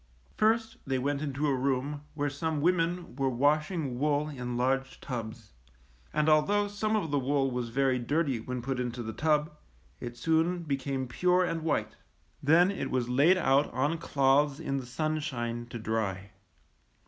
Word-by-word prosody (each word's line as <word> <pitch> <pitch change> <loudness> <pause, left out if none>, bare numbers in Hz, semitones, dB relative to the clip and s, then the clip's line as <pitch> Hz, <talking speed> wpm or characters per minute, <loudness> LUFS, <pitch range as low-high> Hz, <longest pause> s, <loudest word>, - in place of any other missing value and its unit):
First 225 +1 +2
they 135 -1 -1
went 140 +2 -1
into 145 0 -2
a 145 - +2
room 135 +2 -1
where 145 -1 0
some 155 +2 -2
women 170 -2 0
were 135 -1 +1
washing 145 +1 +1
wool 150 +1 +1
in 125 -4 -4
large 135 +2 0
tubs; 115 -3 -6 0.6
and 150 - +1
although 180 +7 +3
some 215 +2 -1
of 170 -8 -1
the 145 - +2
wool 135 0 +1
was 125 -1 -3
very 130 +1 +1
dirty 140 0 0
when 125 +2 -5
put 130 0 -2
into 120 -1 -3
the 110 0 -5
tub, 150 0 +1 0.4
it 120 0 -7
soon 165 +6 +1
became 135 -3 -2
pure 180 +8 +2
and 165 -2 -2
white. 145 -9 -1 0.4
Then 165 +6 +5
it 165 -9 -3
was 125 -2 -1
laid 145 +9 +5
out 140 -4 +3
on 145 +6 0
cloths 140 0 +2
in 140 - -2
the 130 -2 -5
sunshine 125 -5 -2
to 120 - -7
dry. 105 -3 -2
140 Hz, 165 wpm, -29 LUFS, 125-155 Hz, 0.6 s, Then